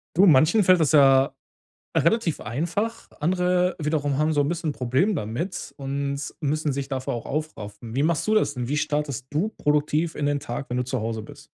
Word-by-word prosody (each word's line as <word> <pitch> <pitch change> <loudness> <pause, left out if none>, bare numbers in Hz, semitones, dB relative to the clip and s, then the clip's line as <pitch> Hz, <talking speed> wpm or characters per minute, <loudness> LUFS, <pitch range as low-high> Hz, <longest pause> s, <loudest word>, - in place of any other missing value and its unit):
Du, 190 - +6
manchen 160 +6 +5
fällt 185 -1 +5
das 155 -3 +2
ja 135 -1 +5 0.6
relativ 220 -9 +2
einfach, 175 - -3
andere 180 +2 +1
wiederum 150 -3 0
haben 155 +1 +2
so 145 - +3
'n 145 - 0
bisschen 165 -3 -2
Problem 130 - +1
damit 120 - -4
und 140 0 -3 0.2
müssen 150 0 0
sich 140 0 -4
dafür 130 -2 -3
auch 120 -2 -5
aufraffen. 115 -7 -5
Wie 140 - +2
machst 165 +3 0
du 215 - +3
das 215 - +2
denn? 125 -3 -4
Wie 145 - -1
startest 145 -3 -2
du 160 +8 0
produktiv 150 -1 0
in 145 - -2
den 145 0 0
Tag, 120 +3 -5
wenn 125 - -2
du 125 - +1
zu 125 +1 -2
Hause 110 0 -3
bist? 110 - -13
145 Hz, 195 wpm, -24 LUFS, 135-165 Hz, 0.6 s, Du